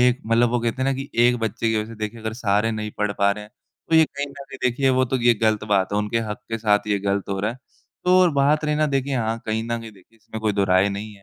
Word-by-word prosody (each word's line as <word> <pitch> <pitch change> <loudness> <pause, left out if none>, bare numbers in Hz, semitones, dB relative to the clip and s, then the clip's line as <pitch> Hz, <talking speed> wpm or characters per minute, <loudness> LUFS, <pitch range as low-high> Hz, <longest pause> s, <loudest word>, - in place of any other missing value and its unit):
एक 125 +1 +3
मतलब 115 +1 +3
वो 120 0 0
कहते 120 +3 -2
हैं 135 - +1
ना 135 - +2
कि 135 +2 -6 0.2
एक 120 0 +3
बच्चे 115 +1 -1
की 110 - +1
वजह 105 0 -1
से - - -8
देखिए 110 +2 -5
अगर 110 0 -4
सारे 105 -1 +1
नहीं 105 -1 -4
पढ़ 105 -1 0
पा 100 0 +4
रहे 105 +1 -4
हैं 105 - -17 0.4
तो 165 - +3
ये 160 - +7
कहीं 140 -1 -5
न - - -13
कहीं 135 -1 -10
देखिए 135 +2 +2
वो 130 0 +3
तो 130 - +2
ये 120 0 +6
ग़लत 110 -1 +2
बात 100 -1 +1
है। 105 - +1
उनके 105 +2 0
हक 105 - -4
के 115 - -2
साथ 105 -1 +2
ये 100 -1 +1
ग़लत 100 0 -1
हो 100 - -2
रहा 105 +2 0
है। 120 - -9 0.5
तो 180 +1 +5
और 180 -2 +5
बात 145 +3 +2
रही 150 0 +1
ना 155 0 +2
देखिए 135 +1 0
हाँ 115 -1 -1
कहीं 110 +1 -1
न 115 - -8
कहीं 115 - -9
देखिए 100 +4 -22
इसमें 110 0 -9
कोई 110 -1 +1
दो 100 -1 +1
राय 95 +1 +3
नहीं 105 +2 -5
है। 100 - -19
115 Hz, 310 wpm, -23 LUFS, 105-130 Hz, 0.5 s, ये